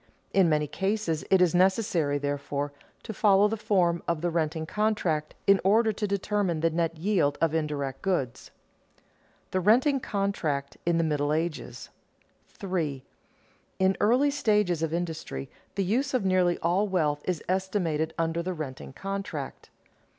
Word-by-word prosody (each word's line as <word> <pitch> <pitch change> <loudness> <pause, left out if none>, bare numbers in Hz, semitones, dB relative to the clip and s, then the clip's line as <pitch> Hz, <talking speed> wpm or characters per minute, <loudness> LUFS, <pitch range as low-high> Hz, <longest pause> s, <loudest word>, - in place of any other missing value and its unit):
In 190 -4 +4
many 150 -1 +2
cases 195 -1 -1
it 190 -1 +5
is 180 - +2
necessary, 180 -5 +2
therefore, 145 0 -3 0.3
to 220 - -6
follow 200 -1 +4
the 220 - -2
form 180 -5 +1
of 170 -2 0
the 175 0 0
renting 160 -1 -1
contract 180 -6 -1
in 195 -1 +5
order 220 +3 +4
to 210 0 -2
determine 200 -4 -1
the 165 0 +2
net 165 0 -1
yield 165 -5 +1
of 165 -1 +1
indirect 145 -4 -2
goods. 175 -11 -1
[Sidenote: - - -26
The 185 - +1
renting 250 - +4
contract 160 - -2
in 170 -1 +3
the 165 - +2
middle 150 -2 0
Ages] 160 +1 -3 0.6
3. 160 -9 -3 0.8
_In 190 0 +3
early 250 +7 +3
stages 210 - +1
of 165 -1 -1
industry 160 - -4 0.2
the 200 - +1
use 255 +8 0
of 230 -6 0
nearly 185 -2 +3
all 180 +5 +2
wealth 155 -6 0
is 180 -4 -2
estimated 180 -4 -1
under 165 0 0
the 185 +2 -3
renting 135 -4 -7
contract. 195 -6 -5
175 Hz, 150 wpm, -27 LUFS, 155-200 Hz, 0.8 s, it